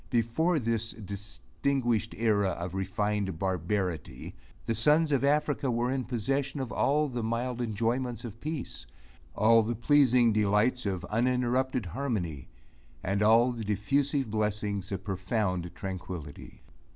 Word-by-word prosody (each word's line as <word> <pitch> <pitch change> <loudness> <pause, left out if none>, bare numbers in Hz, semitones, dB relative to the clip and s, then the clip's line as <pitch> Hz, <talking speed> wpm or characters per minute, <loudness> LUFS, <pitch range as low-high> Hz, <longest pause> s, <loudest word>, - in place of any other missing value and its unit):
Before 130 +9 +1
this 115 -3 -1
distinguished 110 +4 -2
era 105 -3 +2
of 85 +1 -5
refined 95 0 -1
barbarity, 90 -5 -2 0.3
the 115 - 0
sons 150 +7 +4
of 140 -2 +2
Africa 145 -1 +1
were 120 +1 0
in 130 -2 -1
possession 135 +4 -1
of 130 -3 -4
all 150 +2 +2
the 120 -3 -3
mild 120 +2 -2
enjoyments 120 +2 -1
of 115 0 -9
peace 145 - -5 0.5
all 115 +4 +5
the 115 +2 -2
pleasing 125 -2 +4
delights 105 +3 +2
of 95 -3 -2
uninterrupted 125 +1 +1
harmony 90 - -3 0.6
and 100 +2 0
all 115 +4 +5
the 115 -2 -5
diffusive 135 +5 0
blessings 105 -2 -1
of 95 -1 -3
profound 95 -2 -1
tranquility. 90 -5 -7
115 Hz, 125 wpm, -29 LUFS, 100-125 Hz, 0.6 s, all